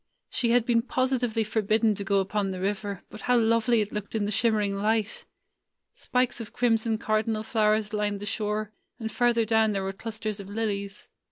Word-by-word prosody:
She 235 Hz, -, 0 dB
had 240 Hz, -1 st, +4 dB
been 235 Hz, -2 st, +3 dB
positively 250 Hz, -2 st, 0 dB
forbidden 220 Hz, +1 st, +2 dB
to 200 Hz, -, -5 dB
go 195 Hz, 0 st, +2 dB
upon 195 Hz, +1 st, -1 dB
the 185 Hz, -1 st, -4 dB
river; 200 Hz, 0 st, -3 dB
but 215 Hz, -, -9 dB
how 250 Hz, +2 st, +3 dB
lovely 230 Hz, 0 st, +3 dB
it 210 Hz, -, -3 dB
looked 210 Hz, +1 st, -5 dB
in 210 Hz, -2 st, +1 dB
the 205 Hz, -, -2 dB
shimmering 210 Hz, -2 st, +2 dB
light! 215 Hz, +2 st, 0 dB, 0.7 s
Spikes 250 Hz, -1 st, -1 dB
of 220 Hz, -, -8 dB
crimson 225 Hz, -2 st, +1 dB
cardinal 215 Hz, 0 st, 0 dB
flowers 215 Hz, -1 st, +1 dB
lined 205 Hz, -1 st, -1 dB
the 205 Hz, -, -6 dB
shore, 215 Hz, 0 st, -2 dB, 0.2 s
and 225 Hz, -2 st, -5 dB
farther 240 Hz, -2 st, +2 dB
down 220 Hz, -1 st, +3 dB
there 195 Hz, -1 st, -1 dB
were 195 Hz, 0 st, -3 dB
clusters 215 Hz, 0 st, -5 dB
of 195 Hz, -1 st, -8 dB
lilies. 200 Hz, -2 st, -3 dB
215 Hz, 185 wpm, -27 LUFS, 205-230 Hz, 0.7 s, had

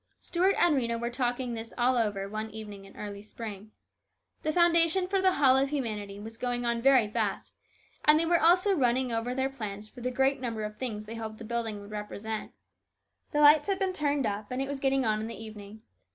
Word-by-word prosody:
Stuart 370 Hz, +3 st, +1 dB
and 345 Hz, -4 st, +4 dB
Rhena 235 Hz, -3 st, 0 dB
were 235 Hz, +1 st, -3 dB
talking 245 Hz, 0 st, -1 dB
this 225 Hz, 0 st, -7 dB
all 250 Hz, +1 st, +3 dB
over 205 Hz, -4 st, 0 dB
one 215 Hz, +2 st, -4 dB
evening 210 Hz, -2 st, -9 dB
in 195 Hz, -, -16 dB
early 200 Hz, -1 st, -6 dB
spring. 215 Hz, -1 st, -8 dB, 0.7 s
The 310 Hz, -, 0 dB
foundation 340 Hz, +2 st, +4 dB
for 385 Hz, 0 st, +1 dB
The 375 Hz, -1 st, +4 dB
Hall 270 Hz, -4 st, +5 dB
of 270 Hz, +1 st, +2 dB
Humanity 210 Hz, -8 st, -4 dB
was 225 Hz, +2 st, -9 dB
going 245 Hz, 0 st, -2 dB
on 235 Hz, 0 st, 0 dB
very 260 Hz, -4 st, +5 dB
fast, 210 Hz, -2 st, -2 dB, 0.5 s
and 300 Hz, +1 st, +6 dB
they 330 Hz, -, +2 dB
were 340 Hz, 0 st, +3 dB
also 365 Hz, +5 st, +5 dB
running 255 Hz, -5 st, +1 dB
over 230 Hz, +2 st, -2 dB
their 265 Hz, 0 st, +1 dB
plans 215 Hz, -5 st, -6 dB
for 245 Hz, +3 st, -13 dB
the 250 Hz, -, -1 dB
great 265 Hz, +1 st, +1 dB
number 230 Hz, -4 st, -3 dB
of 210 Hz, 0 st, -6 dB
things 215 Hz, -5 st, -4 dB
they 220 Hz, -, -7 dB
hoped 220 Hz, -1 st, -6 dB
the 225 Hz, -, -9 dB
building 225 Hz, -2 st, -3 dB
would 200 Hz, +1 st, -12 dB
represent. 210 Hz, +1 st, -5 dB, 0.8 s
The 295 Hz, -, +1 dB
lights 295 Hz, +2 st, +7 dB
had 390 Hz, -, +2 dB
been 380 Hz, -1 st, 0 dB
turned 290 Hz, -5 st, 0 dB
up 205 Hz, 0 st, -3 dB
and 250 Hz, -, -3 dB
it 270 Hz, -, -1 dB
was 280 Hz, 0 st, -4 dB
getting 270 Hz, -1 st, +1 dB
on 215 Hz, -1 st, +1 dB
in 220 Hz, -, -4 dB
the 230 Hz, -, -6 dB
evening. 215 Hz, 0 st, -10 dB
235 Hz, 220 wpm, -29 LUFS, 215-275 Hz, 0.8 s, lights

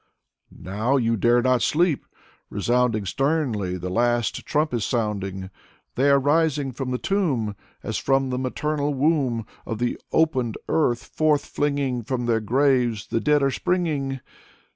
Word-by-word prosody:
€€ -, -, -16 dB
Now 110 Hz, +9 st, 0 dB
you 115 Hz, -2 st, +1 dB
dare 120 Hz, +3 st, +3 dB
not 130 Hz, -2 st, +3 dB
sleep. 160 Hz, +1 st, +1 dB, 0.4 s
Resounding 115 Hz, +1 st, +1 dB
Sternly, 125 Hz, -, 0 dB
the 90 Hz, +1 st, -5 dB
last 120 Hz, +2 st, 0 dB
trump 150 Hz, -1 st, 0 dB
is 115 Hz, -4 st, 0 dB
sounding. 100 Hz, -5 st, -2 dB, 0.4 s
They 135 Hz, +3 st, +2 dB
are 140 Hz, -, +6 dB
rising 145 Hz, -1 st, +1 dB
from 130 Hz, +1 st, -5 dB
the 125 Hz, -, -1 dB
tomb. 135 Hz, -, 0 dB, 0.3 s
As -, -, -2 dB
from 135 Hz, -1 st, +1 dB
the 125 Hz, -, -1 dB
maternal 145 Hz, +2 st, -1 dB
womb 135 Hz, -6 st, +1 dB, 0.2 s
Of 115 Hz, -, -4 dB
the 120 Hz, +2 st, -1 dB
opened 130 Hz, -8 st, +1 dB
earth 125 Hz, -7 st, +1 dB
forth 155 Hz, -2 st, +1 dB
flinging. 140 Hz, -4 st, -1 dB
From 120 Hz, +1 st, -3 dB
their 115 Hz, -1 st, +2 dB
graves 125 Hz, -2 st, +1 dB
the -, -, +1 dB
dead 150 Hz, +2 st, +2 dB
are 135 Hz, -, +2 dB
springing." 145 Hz, -7 st, -1 dB
130 Hz, 150 wpm, -24 LUFS, 115-145 Hz, 0.4 s, are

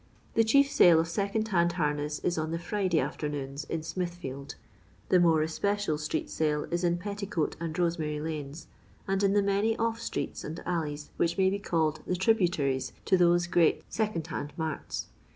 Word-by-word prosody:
The 225 Hz, -, +4 dB
chief 280 Hz, +5 st, +4 dB
sale 175 Hz, -, +7 dB
of 165 Hz, -, +1 dB
second 200 Hz, +5 st, -1 dB
hand 170 Hz, -3 st, +2 dB
harness 150 Hz, -3 st, -1 dB
is 175 Hz, -, +1 dB
on 155 Hz, 0 st, -2 dB
the 165 Hz, -, -1 dB
Friday 180 Hz, -1 st, 0 dB
afternoons, 145 Hz, -1 st, -3 dB
in 160 Hz, 0 st, -3 dB
Smithfield. 160 Hz, -6 st, -5 dB, 0.5 s
The 185 Hz, -, +5 dB
more 165 Hz, -3 st, +4 dB
especial 200 Hz, 0 st, -1 dB
street 150 Hz, 0 st, -2 dB
sale 150 Hz, -1 st, 0 dB
is 175 Hz, +1 st, -1 dB
in 175 Hz, 0 st, +2 dB
Petticoat 200 Hz, -4 st, -3 dB
and 165 Hz, -1 st, -4 dB
Rosemary 165 Hz, -4 st, 0 dB
lanes, 150 Hz, -1 st, -5 dB, 0.4 s
and 195 Hz, 0 st, +1 dB
in 200 Hz, -1 st, +3 dB
the 205 Hz, -1 st, +3 dB
many 200 Hz, +3 st, +1 dB
off 230 Hz, 0 st, -1 dB
streets -, -, -4 dB
and 160 Hz, +3 st, -5 dB
alleys 150 Hz, -4 st, -3 dB
which 170 Hz, 0 st, +1 dB
may 190 Hz, -1 st, +4 dB
be 200 Hz, -, -1 dB
called 160 Hz, -5 st, 0 dB
the 180 Hz, -, +1 dB
tri 190 Hz, +5 st, +4 dB
buuries 145 Hz, -10 st, 0 dB
to 190 Hz, -, +4 dB
those 175 Hz, -1 st, +4 dB
great 175 Hz, -2 st, +3 dB
second 215 Hz, -7 st, -1 dB
hand 145 Hz, 0 st, -5 dB
marts. 160 Hz, -3 st, -3 dB
170 Hz, 180 wpm, -29 LUFS, 155-195 Hz, 0.5 s, sale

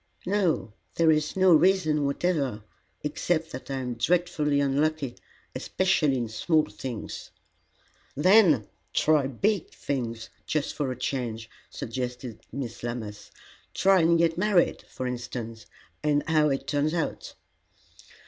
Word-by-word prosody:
"No. 180 Hz, -, 0 dB, 0.2 s
There 165 Hz, -1 st, +4 dB
is 155 Hz, +2 st, 0 dB
no 185 Hz, -2 st, +6 dB
reason 155 Hz, -3 st, +3 dB
whatever, 140 Hz, -, -1 dB, 0.4 s
except 160 Hz, +2 st, -1 dB
that 130 Hz, -, -8 dB
I 135 Hz, -, -2 dB
am 125 Hz, -2 st, -3 dB
dreadfully 150 Hz, +2 st, +1 dB
unlucky, 140 Hz, -1 st, 0 dB, 0.4 s
especially 165 Hz, -7 st, +1 dB
in 120 Hz, -2 st, -2 dB
small 155 Hz, +8 st, +1 dB
things." 110 Hz, +2 st, -7 dB, 0.9 s
"Then 170 Hz, -, +5 dB, 0.3 s
try 150 Hz, -3 st, +3 dB
big 195 Hz, -, 0 dB
things, 115 Hz, -4 st, -4 dB, 0.2 s
just 155 Hz, -2 st, -1 dB
for 145 Hz, -4 st, -2 dB
a 125 Hz, -, -5 dB
change," 120 Hz, -4 st, -3 dB, 0.2 s
suggested 125 Hz, 0 st, -5 dB
Miss 120 Hz, -2 st, -5 dB
Lammas. 115 Hz, -3 st, -6 dB, 0.5 s
"Try 195 Hz, 0 st, +5 dB
and 170 Hz, +1 st, +4 dB
get 165 Hz, 0 st, +2 dB
married, 195 Hz, -3 st, +2 dB
for 130 Hz, -, -5 dB
instance, 120 Hz, -2 st, -5 dB, 0.3 s
and 145 Hz, -1 st, +2 dB
see 160 Hz, -, -2 dB
how 155 Hz, -1 st, +4 dB
it 135 Hz, -1 st, -1 dB
turns 150 Hz, +2 st, 0 dB
out." 165 Hz, -, -3 dB
145 Hz, 130 wpm, -27 LUFS, 125-165 Hz, 0.9 s, no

